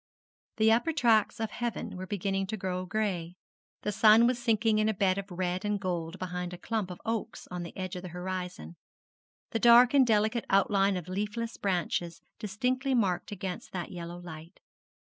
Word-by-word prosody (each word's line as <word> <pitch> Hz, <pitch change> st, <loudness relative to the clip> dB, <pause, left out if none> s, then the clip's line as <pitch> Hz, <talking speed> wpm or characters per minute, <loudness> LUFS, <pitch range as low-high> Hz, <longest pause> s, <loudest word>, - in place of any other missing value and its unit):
The 220 Hz, 0 st, +5 dB
upper 240 Hz, +8 st, +2 dB
tracts 230 Hz, -8 st, +3 dB
of 225 Hz, -1 st, -2 dB
heaven 240 Hz, -6 st, -4 dB
were 185 Hz, +1 st, -6 dB
beginning 195 Hz, -1 st, -1 dB
to 220 Hz, -, -3 dB
grow 185 Hz, -1 st, -3 dB
gray, 180 Hz, -5 st, -2 dB, 0.5 s
the 210 Hz, -, 0 dB
sun 220 Hz, +3 st, +6 dB
was 245 Hz, 0 st, +1 dB
sinking 225 Hz, -2 st, +2 dB
in 215 Hz, 0 st, +2 dB
a 220 Hz, -, -1 dB
bed 190 Hz, 0 st, +2 dB
of 200 Hz, 0 st, -7 dB
red 180 Hz, 0 st, -2 dB
and 210 Hz, -1 st, 0 dB
gold 175 Hz, -2 st, -3 dB
behind 180 Hz, -1 st, -4 dB
a -, -, -6 dB
clump 215 Hz, -1 st, -2 dB
of 180 Hz, -, -8 dB
oaks 225 Hz, -1 st, -3 dB
on 180 Hz, 0 st, -4 dB
the 170 Hz, -, -8 dB
edge 185 Hz, -1 st, -4 dB
of 180 Hz, -, -5 dB
the 185 Hz, -, -7 dB
horizon 180 Hz, 0 st, -5 dB, 0.7 s
the 225 Hz, -, 0 dB
dark 240 Hz, +2 st, +7 dB
and 270 Hz, -3 st, +5 dB
delicate 220 Hz, +1 st, +2 dB
outline 195 Hz, 0 st, +3 dB
of 180 Hz, -, -6 dB
leafless 210 Hz, +5 st, -3 dB
branches 175 Hz, -3 st, -1 dB, 0.2 s
distinctly 255 Hz, +6 st, -1 dB
marked 195 Hz, -3 st, 0 dB
against 190 Hz, -2 st, -6 dB
that 180 Hz, -2 st, -4 dB
yellow 175 Hz, -1 st, -7 dB
light. 170 Hz, 0 st, -10 dB
195 Hz, 180 wpm, -29 LUFS, 180-220 Hz, 0.7 s, dark